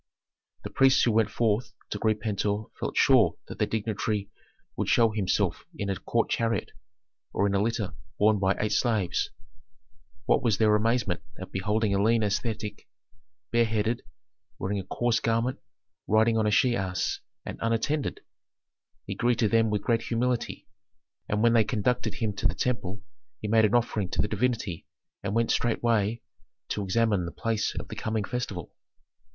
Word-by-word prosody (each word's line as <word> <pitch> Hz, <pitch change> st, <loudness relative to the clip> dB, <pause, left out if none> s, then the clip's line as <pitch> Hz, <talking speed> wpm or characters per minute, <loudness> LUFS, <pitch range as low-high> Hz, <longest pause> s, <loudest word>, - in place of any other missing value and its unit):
The -, -, -6 dB
priests 135 Hz, 0 st, +5 dB
who 120 Hz, -, +3 dB
went 110 Hz, 0 st, +3 dB
forth 110 Hz, 0 st, 0 dB, 0.2 s
to -, -, -3 dB
greet 110 Hz, -1 st, +1 dB
Pentuer 105 Hz, 0 st, -1 dB
felt -, -, -3 dB
sure -, -, +5 dB
that -, -, -9 dB
that -, -, +1 dB
dignitary 105 Hz, -2 st, -2 dB, 0.4 s
would -, -, -1 dB
show 115 Hz, -2 st, +4 dB
himself 105 Hz, -4 st, 0 dB
in 100 Hz, -1 st, -2 dB
a -, -, -1 dB
court 115 Hz, +4 st, 0 dB
chariot, 115 Hz, 0 st, -1 dB, 0.6 s
or 100 Hz, -, +2 dB
in 100 Hz, -, +1 dB
a 100 Hz, -, +2 dB
litter 110 Hz, -2 st, -1 dB, 0.2 s
borne 105 Hz, 0 st, +4 dB
by 95 Hz, 0 st, +2 dB
eight 105 Hz, -, 0 dB
slaves. 110 Hz, -7 st, +1 dB, 1.0 s
What -, -, +3 dB
was 110 Hz, -4 st, +2 dB
their 105 Hz, -1 st, +4 dB
amazement 105 Hz, -4 st, +1 dB, 0.2 s
at 95 Hz, 0 st, -8 dB
beholding 105 Hz, +2 st, 0 dB
a 100 Hz, -, +2 dB
lean 115 Hz, +1 st, +3 dB
ascetic, 105 Hz, 0 st, -2 dB, 0.6 s
bareheaded, 115 Hz, 0 st, +1 dB, 0.6 s
wearing 100 Hz, +2 st, -2 dB
a -, -, -4 dB
coarse 120 Hz, +3 st, +1 dB
garment, 115 Hz, +3 st, 0 dB, 0.5 s
riding 110 Hz, +2 st, +4 dB
on 110 Hz, -1 st, +2 dB
a -, -, +2 dB
she 120 Hz, +3 st, +4 dB
ass, 95 Hz, -2 st, -1 dB, 0.3 s
and -, -, -6 dB
unattended! 115 Hz, +6 st, 0 dB, 0.8 s
He -, -, -4 dB
greeted 120 Hz, -3 st, +1 dB
them 115 Hz, -1 st, +4 dB
with 105 Hz, -1 st, -1 dB
great 115 Hz, -1 st, +2 dB
humility, 120 Hz, +1 st, -2 dB, 0.6 s
and 105 Hz, +1 st, +1 dB
when 115 Hz, 0 st, +5 dB
they 115 Hz, -2 st, +5 dB
conducted 120 Hz, +4 st, -1 dB
him 110 Hz, -4 st, -1 dB
to -, -, +2 dB
the -, -, -2 dB
temple 105 Hz, -5 st, -2 dB, 0.4 s
he 110 Hz, -, -4 dB
made 110 Hz, +1 st, +5 dB
an 110 Hz, +3 st, +2 dB
offering 110 Hz, -5 st, +1 dB
to -, -, 0 dB
the -, -, 0 dB
divinity 115 Hz, -9 st, -1 dB, 0.3 s
and 100 Hz, +1 st, -3 dB
went 115 Hz, 0 st, +2 dB
straightway 115 Hz, -1 st, +1 dB, 0.5 s
to 105 Hz, -, -2 dB
examine 100 Hz, -2 st, +1 dB
the -, -, -5 dB
place 115 Hz, -2 st, -1 dB
of -, -, -5 dB
the -, -, -6 dB
coming 110 Hz, -1 st, -2 dB
festival. 100 Hz, -7 st, -4 dB
110 Hz, 165 wpm, -27 LUFS, 105-115 Hz, 1.0 s, priests